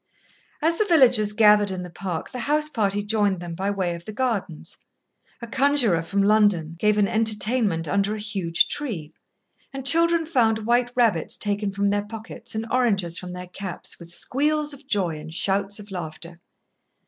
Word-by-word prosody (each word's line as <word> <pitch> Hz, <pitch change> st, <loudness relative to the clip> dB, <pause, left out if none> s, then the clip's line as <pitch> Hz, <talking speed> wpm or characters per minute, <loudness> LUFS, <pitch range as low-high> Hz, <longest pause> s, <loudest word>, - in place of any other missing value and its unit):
As 330 Hz, +1 st, +2 dB
the 430 Hz, -, +3 dB
villagers 250 Hz, -, +4 dB
gathered 210 Hz, -1 st, +5 dB
in 185 Hz, -1 st, -4 dB
the 180 Hz, -, -9 dB
park, 175 Hz, -1 st, -5 dB
the 250 Hz, -, -6 dB
house 300 Hz, +5 st, 0 dB
party 205 Hz, -6 st, -1 dB
joined 205 Hz, -3 st, +1 dB
them 175 Hz, -1 st, -6 dB
by 190 Hz, +4 st, -2 dB
way 190 Hz, -4 st, -1 dB
of 170 Hz, 0 st, -9 dB
the -, -, -6 dB
gardens. 210 Hz, -, -3 dB, 0.7 s
A -, -, -2 dB
conjurer 255 Hz, -, +3 dB
from 195 Hz, +4 st, 0 dB
London 200 Hz, -6 st, +2 dB
gave 210 Hz, +1 st, +2 dB
an 205 Hz, -1 st, +3 dB
entertainment 215 Hz, -5 st, 0 dB
under 200 Hz, +6 st, 0 dB
a -, -, -6 dB
huge 195 Hz, -6 st, 0 dB
tree, 200 Hz, -, -5 dB, 0.6 s
and 270 Hz, -1 st, -7 dB
children 335 Hz, +3 st, +4 dB
found 225 Hz, -8 st, +1 dB
white 240 Hz, +1 st, +2 dB
rabbits 225 Hz, -10 st, +2 dB
taken 205 Hz, 0 st, 0 dB
from 200 Hz, +1 st, 0 dB
their 205 Hz, 0 st, +1 dB
pockets 220 Hz, +2 st, -8 dB
and 220 Hz, +1 st, -2 dB
oranges 195 Hz, -9 st, +1 dB
from 180 Hz, -1 st, -8 dB
their 180 Hz, 0 st, -7 dB
caps, 185 Hz, 0 st, -7 dB
with 170 Hz, -1 st, -12 dB
squeals 295 Hz, -, -1 dB
of 280 Hz, 0 st, -14 dB
joy 180 Hz, -, 0 dB
and 160 Hz, +1 st, -9 dB
shouts 200 Hz, +2 st, 0 dB
of 210 Hz, -1 st, -12 dB
laughter. 170 Hz, -1 st, -7 dB
205 Hz, 175 wpm, -24 LUFS, 180-240 Hz, 0.7 s, gathered